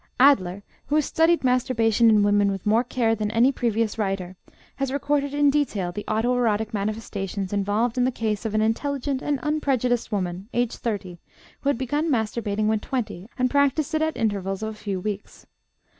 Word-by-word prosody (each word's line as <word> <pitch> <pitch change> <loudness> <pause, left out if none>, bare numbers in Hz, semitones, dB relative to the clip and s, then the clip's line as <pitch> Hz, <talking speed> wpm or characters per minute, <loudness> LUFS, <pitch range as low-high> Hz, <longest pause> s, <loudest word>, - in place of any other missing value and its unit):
Adler, 205 -8 +4 0.2
who 295 - 0
has 305 -2 +3
studied 330 0 +2
masturbation 235 -3 +3
in 210 -2 +5
women 205 0 +3
with 195 -2 -4
more 220 +3 +3
care 235 -2 0
than 215 -1 -1
any 230 +5 +4
previous 230 -4 -1
writer, 195 -3 -2 0.4
has 275 -1 -1
recorded 285 0 0
in 290 0 +3
detail 220 -11 0
the 210 +4 -6
auto 225 +3 +1
erotic 220 -3 0
manifestations 200 -2 -3
involved 210 +5 0
in - - +3
the 255 - +3
case 220 -3 -2
of 220 -2 -3
an 215 - +3
intelligent 270 +4 -1
and 290 -2 -1
unprejudiced 265 -6 0
woman, 185 0 -3
aged 240 -1 0
30, 195 -6 -4 0.4
who 280 - -1
had 285 - +1
begun 290 +6 -1
masturbating 215 -4 -1
when 215 0 +2
twenty, 220 -6 -4
and 255 -1 +1
practiced 285 +1 +2
it 315 - +1
at 315 0 0
intervals 200 -3 -1
of 220 - -2
a - - -6
few 205 -3 -4
weeks. 205 +1 -6
225 Hz, 185 wpm, -24 LUFS, 205-265 Hz, 0.4 s, in